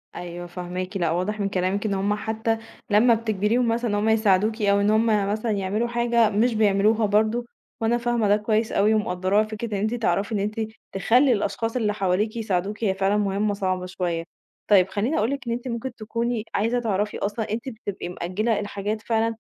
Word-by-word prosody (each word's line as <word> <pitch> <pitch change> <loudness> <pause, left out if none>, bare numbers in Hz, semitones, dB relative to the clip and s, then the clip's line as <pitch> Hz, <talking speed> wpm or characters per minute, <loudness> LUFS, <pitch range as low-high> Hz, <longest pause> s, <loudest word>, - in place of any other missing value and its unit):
أيوه 175 0 -6
فاهماكِ. 180 +2 -5
لأ، 175 -3 0
واضح 185 +5 -1
من 200 -1 0
كلامِك 190 +2 -1
إن 200 - 0
هم 195 +2 0
حتى 220 +2 -1 0.3
لمّا 220 +3 +5
بتجبريهم 225 +2 +1
مثلًا 230 +1 0
إن - - +1
هم 210 +2 +1
يساعدوكِ 220 0 +2
أو 200 -1 +3
إن 205 - +2
هم 220 +1 +3 0.3
مثلًا 220 +2 -1
يعملوا 205 +3 -1
حاجة 235 -1 +2
مش 225 +4 +2
بيعملوها 215 +1 +3
برضه، 220 +3 +1 0.4
وأنا 230 +2 +2
فاهمة 240 -2 0
ده 205 +1 +4
كويس 215 +1 0
أوي 210 +2 +3
ومقدّراه، 200 0 +1
فكرة 215 +1 -5
إن 195 - -2
أنتِ 220 +3 0
تعرفي 225 -2 0
إن - - 0
أنتِ 210 +3 -2 0.3
تخلّي 245 +8 +3
الأشخاص 225 +2 -2
اللي 215 -4 +1
حواليكِ 200 +2 0
يساعدوكِ، 205 0 -2
هي 195 -3 +2
فعلًا 195 +2 +1
مُهمّة 205 0 0
صعبة 185 -2 -2
شوية. 175 -2 -2 0.5
طيب 195 -3 +6
خلّيني 225 +10 -1
أقول 220 +6 +1
لِك 275 -3 -5
إن - - -1
أنتِ 245 +2 -5
ممكن 240 +1 -4
تكوني 230 +1 -2
عايزة 230 +4 +1
تعرفي 210 -3 -1
أصلًا 210 +1 -3
أنتِ 235 +5 -3
بتبقى 205 -6 -6
مأجّلة 195 +6 -1
الحاجات 205 +1 -3
فعلًا 225 0 0
215 Hz, 190 wpm, -24 LUFS, 195-225 Hz, 0.5 s, طيب